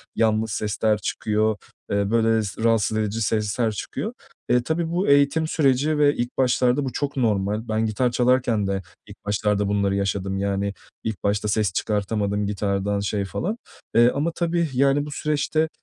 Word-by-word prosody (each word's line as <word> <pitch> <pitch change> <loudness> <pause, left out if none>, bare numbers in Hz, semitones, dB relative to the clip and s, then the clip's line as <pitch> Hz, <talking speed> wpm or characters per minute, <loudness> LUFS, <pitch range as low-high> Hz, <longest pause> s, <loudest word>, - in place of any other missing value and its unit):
yanlış 110 -1 +1
sesler 105 +1 0
çıkıyor, 110 +1 0 0.4
eee, 100 +1 0
böyle 115 -1 +3
s 100 +3 -5
rahatsız 110 -1 +2
edici 110 +1 -1
sesler 110 +1 0
çıkıyor. 105 - -5 0.4
Eee, 125 -1 +3
tabii 160 +3 -1
bu 180 +3 0
eğitim 140 +3 +4
süreci 150 0 +2
ve 145 -1 +4
ilk 120 +1 -3
başlarda 125 +1 +2
bu 130 - -3
çok 145 -1 -3
normal. 105 -1 0
Ben 110 +1 0
gitar 120 +3 0
çalarken 120 -4 +2
de 95 0 -1 0.3
ilk 100 0 -14
başlarda 105 0 0
bunları 100 -1 +1
yaşadım; 100 -1 -1
yani 100 0 -1 0.3
ilk 110 -3 -4
başta 100 +1 0
ses 105 -3 +1
çıkartamadım 105 0 -1
gitardan 100 0 -1
şey 100 0 -1
falan, 200 - -3 0.4
eee, 120 +1 +6
ama 155 +4 0
tabii, 170 -1 0
yani, 140 +2 +2
bu 150 - -7
süreçte, 150 +2 0
110 Hz, 165 wpm, -23 LUFS, 100-135 Hz, 0.4 s, eee